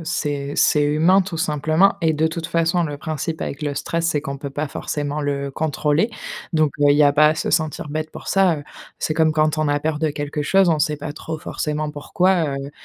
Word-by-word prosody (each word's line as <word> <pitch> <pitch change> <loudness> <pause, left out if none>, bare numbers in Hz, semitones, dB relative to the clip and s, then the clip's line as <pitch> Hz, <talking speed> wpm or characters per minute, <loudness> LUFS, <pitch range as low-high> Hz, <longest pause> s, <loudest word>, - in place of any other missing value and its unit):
c'est 145 -4 -2
c'est 150 - +3
humain, 160 +6 +4
tout 185 -3 -4
simplement 155 +3 +2
et 160 -2 +2
de 155 +1 +1
toute 165 0 -5
façon, 170 +1 +1
le 145 -2 -4
principe 160 +1 -4
avec 140 - -5
le 145 -1 -2
stress, 165 +4 -2
c'est 155 -3 +1
qu'on 140 -1 -5
peut 140 0 -6
pas 145 +2 -3
forcément 145 +1 -3
le 140 -1 -2
contrôler. 150 - 0 0.4
Donc, 155 -2 +3
heu, - - +4
il 145 - +4
y 150 - +5
a 145 -1 +5
pas 150 +1 +5
à 155 - +2
se - - -2
sentir 155 -1 -1
bête 155 +1 -3
pour - - -9
ça, 190 -5 +3
heu, 145 - -8 0.4
c'est 155 - -1
comme 160 -1 +3
quand 155 0 +2
on 155 - +1
a 145 0 +1
peur 155 0 -1
de 155 0 0
quelque 145 0 -3
chose, 195 +4 +3
on 160 - +2
sait 150 0 +1
pas 145 0 -6
trop 160 +1 -6
forcément 150 0 -3
pourquoi, 160 +1 +1
heu, 140 +1 -6
155 Hz, 235 wpm, -21 LUFS, 145-160 Hz, 0.4 s, y